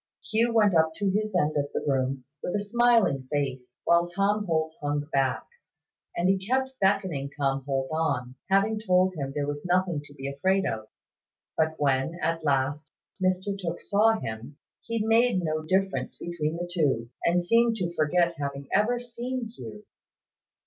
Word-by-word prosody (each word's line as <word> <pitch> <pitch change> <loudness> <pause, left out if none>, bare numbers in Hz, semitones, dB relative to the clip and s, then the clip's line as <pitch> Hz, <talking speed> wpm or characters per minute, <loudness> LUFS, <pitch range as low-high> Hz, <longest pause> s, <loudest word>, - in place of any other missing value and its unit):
Hugh 230 +2 +3
went 215 -4 +4
up 160 -1 +3
to 200 +1 0
his 210 0 -1
end 155 -3 +2
of 145 0 -1
the - - -1
room, 135 -1 0 0.2
with - - -3
a - - +1
smiling 210 - +2
face, 130 -4 -2
while 170 0 +4
Tom 200 +4 0
Holt 160 -1 0
hung 145 0 0
back; 135 -1 +1 0.7
and 175 - +2
he 190 0 +3
kept 260 +7 0
beckoning 190 -8 +1
Tom 140 -1 -1
Holt 135 -1 0
on, 140 -6 -1 0.2
having 200 +3 +3
told 185 -3 +3
him 140 -5 -4
there 145 0 -2
was 145 0 -4
nothing 180 -3 +1
to 145 - -14
be 135 -1 -6
afraid 190 +8 +1
of. 110 -1 -3 0.7
But 160 0 +1
when, 140 +3 +1
at 165 -1 -1
last, 145 +1 0 0.3
Mr 185 +2 +1
Tooke 175 -3 -4
saw 220 +2 +3
him, 115 +6 -7 0.2
he 230 -2 -2
made 225 -4 +3
no 155 -1 -1
difference 190 +4 -1
between 165 -2 -3
the 175 +1 -4
two, 130 -9 0
and 175 +1 +3
seemed 230 +3 +4
to 175 -5 -2
forget 170 +2 +2
having 140 -1 -4
ever 230 +5 +2
seen 245 0 -5
Hugh. 110 - -9
170 Hz, 170 wpm, -27 LUFS, 140-200 Hz, 0.7 s, went